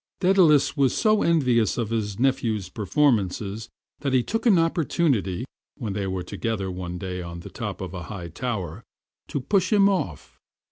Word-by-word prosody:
Daedalus 180 -7 +4
was 135 -4 +2
so 215 -2 +3
envious 125 - +2
of 115 -2 -2
his 105 -3 -1
nepnew's 115 -6 0
performances 105 -1 0 0.3
that 140 -2 -2
he 125 -2 +4
took 225 - -1
an 200 -6 +6
opportunity, 145 - +1 0.3
when 110 -5 -4
they 100 -1 -2
were 95 -1 -3
together 100 0 -3
one 90 -1 -5
day 90 -1 -4
on 85 0 -7
the - - -10
top 105 -6 -5
of 95 -1 -5
a 90 -2 -5
high 90 -5 -6
tower, 100 -2 -4 0.4
to - - -2
push 185 - +1
him 200 -2 +5
off. 140 - -2
115 Hz, 170 wpm, -25 LUFS, 95-150 Hz, 0.4 s, an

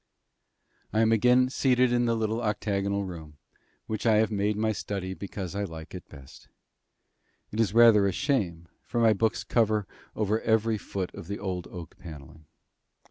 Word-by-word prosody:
I 110 - +2
am 115 0 +3
again 125 +3 +4
seated 125 -2 +2
in 120 0 +2
the 115 -1 +1
little 110 +1 -1
octagonal 100 -2 -1
room, 80 -5 -9 0.5
which 110 +1 -3
I 110 - +5
have 110 +1 +2
made 105 0 0
my 110 0 +1
study 100 -3 -4
because 95 -2 -6
I 100 +1 -2
like 80 -4 -8
it 90 - -9
best. 70 -3 -14 1.0
It 105 - -5
is 110 -2 +1
rather 115 -4 +7
a - - +1
shame, 90 - -1
for 120 - -3
my 115 -2 +5
books 110 +2 0
cover 110 -3 +1 0.3
over 110 +1 0
every 110 0 +1
foot 95 -2 -5
of 80 - -9
the 100 +1 -4
old 90 -3 -4
oak 85 -2 -10
panelling. 80 -1 -11
105 Hz, 170 wpm, -27 LUFS, 95-115 Hz, 1.0 s, rather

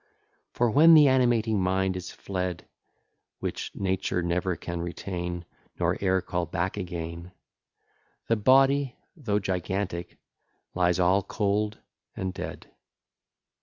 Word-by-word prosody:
For, 120 -2 +1
when 160 +6 +8
the 150 -2 +8
animating 120 -5 +3
mind 95 0 +1
is 90 -1 -5
fled, 90 -3 -4 0.7
(Which - - -4
nature 95 -1 -1
never 90 +1 0
can 85 +1 -5
retain, 85 0 -4 0.3
Nor - - +1
e'er 95 -1 +2
call 90 -1 -2
back 85 +3 -2
again,) 85 -2 -6 0.9
The 115 - +3
body, 135 +4 +4 0.2
though 120 - -1
gigantic, 95 -2 -3 0.6
lies 90 0 +2
all 90 +2 +4
cold 105 +1 -1 0.4
and 95 -1 -3
dead. - - -7
95 Hz, 115 wpm, -27 LUFS, 90-105 Hz, 0.9 s, when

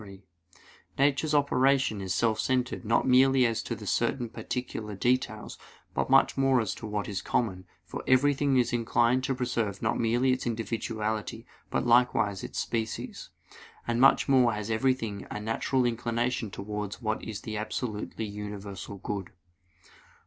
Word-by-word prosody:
3: 100 -1 -12 0.7
Nature's 145 +2 +2
operation 135 -6 +2
is 95 -1 -4
self 110 +4 +1
centered 130 -1 0
not 115 +3 +2
merely 130 0 +5
as 115 -1 0
to - - -4
certain 120 -3 0
particular 110 -2 -5
details, 115 0 -1 0.3
but - - -1
much - - +5
more 135 -1 +3
as 110 -4 -1
to 110 - -8
what 105 -1 -2
is 100 -2 -3
common; 95 -6 -1 0.2
for - - -6
everything 140 +1 +3
is 120 -1 +2
inclined 120 +2 +2
to 135 0 0
preserve 115 -6 -2
not - - 0
merely 120 +3 +2
its 130 -1 -1
individuality, 110 0 -3 0.2
but - - -1
likewise 120 -5 +3
its - - -7
species. 110 -1 -3 0.6
And 120 +1 +1
much 135 - +5
more 130 -4 +4
has 105 +1 -4
everything 115 -3 0
a - - -4
natural 115 +4 0
inclination 120 0 -1
towards 105 +1 -5
what 110 -2 -2
is 105 -2 -6
the 110 - -5
absolutely 110 0 -4
universal 100 -1 -7
good. 100 -1 -4
115 Hz, 150 wpm, -28 LUFS, 105-130 Hz, 0.7 s, merely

